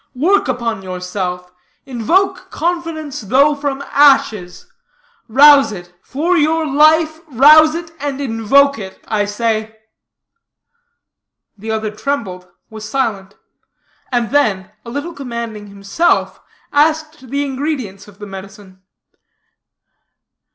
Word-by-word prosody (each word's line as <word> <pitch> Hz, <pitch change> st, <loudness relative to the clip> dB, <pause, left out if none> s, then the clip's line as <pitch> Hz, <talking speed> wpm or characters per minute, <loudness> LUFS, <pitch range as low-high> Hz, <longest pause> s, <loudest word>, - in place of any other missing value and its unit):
Work 365 Hz, +10 st, +2 dB
upon 235 Hz, -5 st, -2 dB
yourself; 180 Hz, -1 st, -5 dB, 0.3 s
invoke 370 Hz, -, 0 dB
confidence, 330 Hz, -5 st, -4 dB
though 270 Hz, +8 st, +3 dB
from 280 Hz, -1 st, -4 dB
ashes; 270 Hz, -11 st, +2 dB, 0.6 s
rouse 275 Hz, +2 st, +6 dB
it; 175 Hz, -3 st, -10 dB
for 325 Hz, +7 st, -1 dB
your 320 Hz, 0 st, +1 dB
life, 310 Hz, +2 st, +3 dB
rouse 305 Hz, +4 st, +6 dB
it, 330 Hz, -1 st, -6 dB
and 285 Hz, -1 st, -4 dB
invoke 275 Hz, +2 st, +2 dB
it, 190 Hz, -2 st, -9 dB
I 210 Hz, -2 st, 0 dB
say." 220 Hz, +1 st, -2 dB, 1.8 s
The 215 Hz, +2 st, -9 dB
other 220 Hz, -1 st, -2 dB
trembled, 210 Hz, -7 st, -4 dB, 0.2 s
was 215 Hz, -1 st, -8 dB
silent; 210 Hz, -7 st, -3 dB, 0.8 s
and 240 Hz, -3 st, -1 dB
then, 210 Hz, -9 st, 0 dB
a 235 Hz, -, -10 dB
little 285 Hz, +7 st, -5 dB
commanding 235 Hz, -6 st, -7 dB
himself, 200 Hz, +12 st, -1 dB, 0.3 s
asked 310 Hz, -2 st, 0 dB
the 280 Hz, +2 st, -1 dB
ingredients 260 Hz, -8 st, -4 dB
of 205 Hz, -1 st, -17 dB
the 205 Hz, -, -9 dB
medicine. 195 Hz, -1 st, -12 dB
255 Hz, 110 wpm, -16 LUFS, 205-295 Hz, 1.8 s, rouse